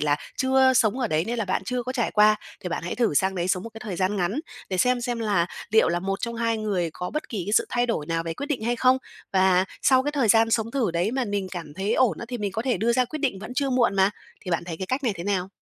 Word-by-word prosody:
là 145 -1 +2 0.2
chưa 260 0 +4
sống 235 0 +2
ở 245 - +1
đấy 155 +2 +1
nên 235 +1 -3
là 225 - 0
bạn 190 0 -1
chưa 250 +2 -2
có 255 +2 -4
trải 240 -4 0
qua. 215 0 +5 0.2
Thì 180 - -4
bạn - - -3
hãy 175 - -3
thử 230 -11 +1
sang 190 +5 +2
đấy 175 0 -2
sống 180 0 +1
một 230 - -6
cái 225 - -9
thời 190 -5 -4
gian 190 +3 0
ngắn 195 - 0 0.3
để 185 -1 -2
xem 250 +4 +3
xem 240 -1 -2
là 205 -6 +1 0.2
liệu 220 -5 +5
là 175 +1 0
1 195 +1 -2
trong 235 -1 -3
2 230 -1 0
người 190 -6 -1
có 180 - -5
bất 305 - -4
kỳ 205 -6 -3
cái 205 - -3
sự - - +4
thay 245 0 +1
đổi 155 -11 -2
nào 165 0 -1
về 165 -1 -4
quyết 285 - -5
định 275 -7 -2
hay 240 +1 0
không? 255 +2 +4 0.3
Và 185 -1 +4 0.2
sau 260 -1 +5
cái 295 +1 -2
thời 265 -7 +1
gian 225 +2 +5
sống 225 0 +1
thử 245 -8 0
đấy 175 +5 0
mà 260 -1 0
mình 200 -2 -2
cảm 165 -5 -7
thấy 195 +4 -1
ổn 235 -10 +2
á - - -5
thì 245 - -4
mình 205 -3 -2
có 225 - -2
thể 255 -1 +1
đưa 235 +2 +1
ra 255 +1 +3
quyết 310 +5 -6
định 260 -9 -1
vẫn 220 +5 -8
chưa 275 -1 0
muộn 240 -5 +2
mà. 190 +1 +4 0.3
Thì 180 - -4
bạn 170 0 0
thấy 170 -2 -5
cái 190 +2 -5
cách 260 +5 -1
này 225 - +2
thế 170 - -6
nào? 190 -2 -1
215 Hz, 310 wpm, -25 LUFS, 185-245 Hz, 0.3 s, qua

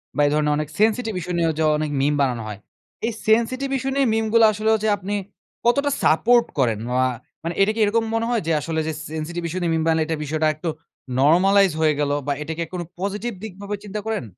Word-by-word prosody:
বা 145 - +2
এই 145 - +1
ধরনের 150 0 +1
Sensitive 220 0 +2
issue 180 +1 -5
নিয়েও 165 -1 +2
যে - - +2
অনেক 155 0 -2
মিম 145 +2 +2
বানানো 125 -4 0
হয়। 105 -1 -7 0.5
এই 235 - 0 0.2
Sensitive 255 +5 +2
issue 270 +1 -2
নিয়ে 275 -3 +3
মিম 225 0 +1
গুলা 230 -1 +7
আসলে 215 +1 -1
হচ্ছে 220 0 +1
আপনি 200 +2 -5 0.5
কতটা 280 +4 +3
সাপোর্ট 235 +9 +4
করেন 115 -5 +2
মা 130 +1 +2 0.4
মানে 170 - -2
এটা 205 +2 +4
কি 225 - -4
এরকম 225 +2 +1
মনে 225 0 0
হয়? 235 -3 +1
যে - - +2
আসলে 160 +1 -2
যে - - 0 0.2
Sensitive 170 +2 -4
issue 180 +3 -3
নিয়ে 170 -1 0
মিম 160 - 0
বানায়, 160 -1 +2
এটা 160 - -1
বিষয়টা 155 +2 -1
আরেকটু 155 +2 -3 0.5
normalized 185 +4 +4
হয়ে 155 -1 +4
গেল 145 -1 +1 0.2
বা 145 - +1
এটা 155 - -4
কি 170 - -4
আর 160 - -20
কোনো 175 -2 -4 0.2
পজিটিভ 205 +5 -2
দিকভাবে 200 0 -5
চিন্তা 210 +1 -4
করেন? 220 - -1
180 Hz, 220 wpm, -22 LUFS, 155-220 Hz, 0.5 s, গুলা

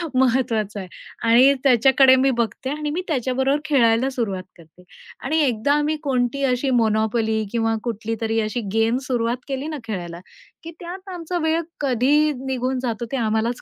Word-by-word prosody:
महत्वाचा 235 -5 +1
आहे. 190 - -7 0.4
आणि 255 +4 +6
त्याच्याकडे 265 +1 +5
मी 265 +1 +3
बघते 235 +3 -2
आणि 300 +1 -3
मी 340 +5 -2
त्याच्याबरोबर 265 0 0
खेळायला 250 -3 +3
सुरुवात 220 -8 -3
करते. 170 +1 -19 0.4
आणि 310 +5 0
एकदा 250 +1 +1
आम्ही 295 +1 +1
कोणती 260 -1 0
अशी 255 +1 0
मोनोपोली 220 0 +1
किंवा 225 -1 0
कुठलीतरी 225 0 -2
अशी 215 +2 -2
गेम 225 +2 +2
सुरुवात 240 -1 0
केली 275 +1 -4
ना 310 -1 -4
खेळायला, 175 -6 -6 0.4
की 330 - -8
त्यात 370 +3 -8
आमचा 350 0 -4
वेळ 320 +1 +1 0.2
कधी 285 +3 +2
निघून 260 0 -2
जातो, 235 -1 -2
ते 270 - -1
आम्हालाच 225 +1 -1
250 Hz, 155 wpm, -22 LUFS, 225-275 Hz, 0.4 s, आणि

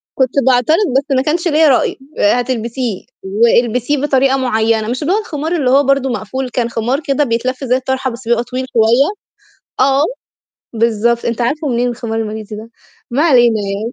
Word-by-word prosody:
كنت 260 -2 +1 0.2
باعترض 255 +5 +3 0.2
بس 275 - +1
ما 260 - +2
كانش 330 +5 -1
ليّا 315 -1 +4
رأي، 260 - +1 0.2
آآ، 205 - +4
هتلبسيه 240 -3 -3 0.2
والبسيه 235 +6 +1
بطريقة 270 -1 +2
مُعيّنة، 225 -3 0
مش 245 +2 -3
اللي 350 +6 +1
هو - - +2
الخمار 320 -4 -3
اللي 275 -7 0
هو 280 +2 +5
برضه 275 -1 +1
مقفول، 255 +2 -4
كان 235 -1 -1
خمار 240 +5 -1
كده 285 -1 0
بيتلف 255 +1 -2
زي 250 -1 +1
الطرحة 265 0 -2
بس 235 0 -10
بيبقى 235 0 +2
طويل 255 +1 -4
شوية، 235 +5 +3 0.7
آه، 275 +2 +3 0.7
بالضبط، 230 +1 +1
أنت 235 0 -2
عارفُه 290 +6 -1
منين 245 0 0
الخمار 230 -2 -4
الماليزي 215 -1 -5
ده؟ 225 +2 -10 0.4
ما 270 +5 +1
علينا 245 -8 +4
يعني 200 +4 -4
250 Hz, 175 wpm, -15 LUFS, 230-270 Hz, 0.7 s, هو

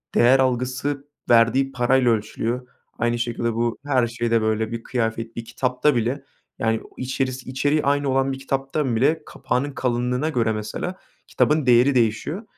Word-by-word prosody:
değer 130 +3 +5
algısı 130 +2 -1 0.2
verdiği 120 +4 +4
parayla 125 -1 +3
ölçülüyor. 115 +3 -2 0.3
Aynı 120 +1 0
şekilde 120 -1 -1
bu 115 +1 -1
her 130 -4 +2
şeyde 115 -1 0
böyle. 110 0 0
Bir 115 0 -5
kıyafet, 115 -2 -2
bir 115 - -5
kitapta 125 +4 0
bile 120 +4 -1 0.4
yani 115 0 0
o - - -15
içerisi 130 0 -3
içeriği 145 +4 +1
aynı 140 0 +1
olan 135 +1 +1
bir 135 - -7
kitaptan 135 -1 -1
bile 150 +7 +2
kapağının 140 +3 -2
kalınlığına 125 +2 -1
göre 115 -7 +1
mesela 110 - -4 0.3
kitabın 150 -1 +2
değeri 125 +2 +5
değişiyor 120 - 0
125 Hz, 155 wpm, -23 LUFS, 115-135 Hz, 0.4 s, değer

